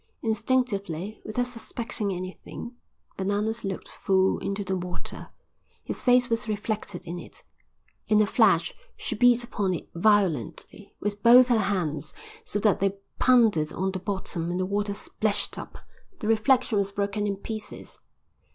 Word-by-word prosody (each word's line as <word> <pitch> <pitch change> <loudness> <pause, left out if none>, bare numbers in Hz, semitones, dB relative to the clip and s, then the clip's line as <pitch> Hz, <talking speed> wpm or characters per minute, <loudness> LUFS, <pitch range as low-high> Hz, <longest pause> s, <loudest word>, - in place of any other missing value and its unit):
Instinctively, 215 -5 -1
without 245 +3 -1
suspecting 230 -3 -3
anything, 185 +6 -7 0.4
Bananas 205 +4 -1
looked 195 -2 -4
full 190 0 +1
into 200 +1 -3
the 190 0 -1
water. 180 -1 -5 0.5
His - - -3
face 250 -1 +4
was 230 -2 -1
reflected 210 -3 -3
in 175 +1 -5
it. - - -12 0.6
In 215 -1 +4
a 215 - +5
flash - - +3 0.2
she - - -3
beat 245 -1 +4
upon 205 -6 -1
it - - -7
violently, 175 - 0
with 205 0 -3
both 245 +3 +8
her 235 -2 +4
hands, 175 -7 -1 0.3
so - - -2
that 210 -2 +3
they 195 0 0 0.2
pounded 220 -12 +4
on 190 +1 -1
the 185 - -4
bottom 185 -3 -3
and 175 +1 -1
the 185 - +1
water 200 +1 -1
splashed 210 0 -2
up. - - -9 0.4
The 215 - -4
reflection 225 0 +3
was 200 0 -1
broken 200 +1 -1
in 200 - -1
pieces. 215 +2 -6
205 Hz, 150 wpm, -26 LUFS, 190-225 Hz, 0.6 s, both